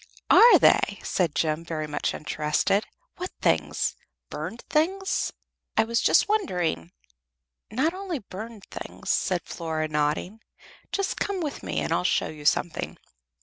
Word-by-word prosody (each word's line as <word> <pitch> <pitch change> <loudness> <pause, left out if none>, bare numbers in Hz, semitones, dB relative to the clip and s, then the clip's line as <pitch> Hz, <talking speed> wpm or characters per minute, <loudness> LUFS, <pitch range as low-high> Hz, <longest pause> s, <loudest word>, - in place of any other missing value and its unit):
"Are 475 - +9
they?" - - +4
said 170 -5 0
Jem, 155 0 0
very 160 -2 -3
much 150 -1 -2
interested. 150 +7 0 0.3
"What 365 +1 -4
things? - - +1 0.4
Burned 230 - -5
things? 380 +6 +1 0.5
I 220 - +6
was 230 +1 0
just - - +4
wondering 180 - 0 0.4
" 60 0 -59
"Not 270 +10 +1
only 375 -3 -4
burned 215 -1 -9
things," - - -5
said 180 -3 +1
Flora, 160 -2 -3
nodding. 150 +7 -1 0.5
"Just 395 -1 -1
come 400 -2 -1
with 305 -5 -4
me - - -2
and - - -1
I'll - - +1
show - - +1
you 150 -1 -10
something." 165 +2 0
185 Hz, 145 wpm, -26 LUFS, -, 0.5 s, Are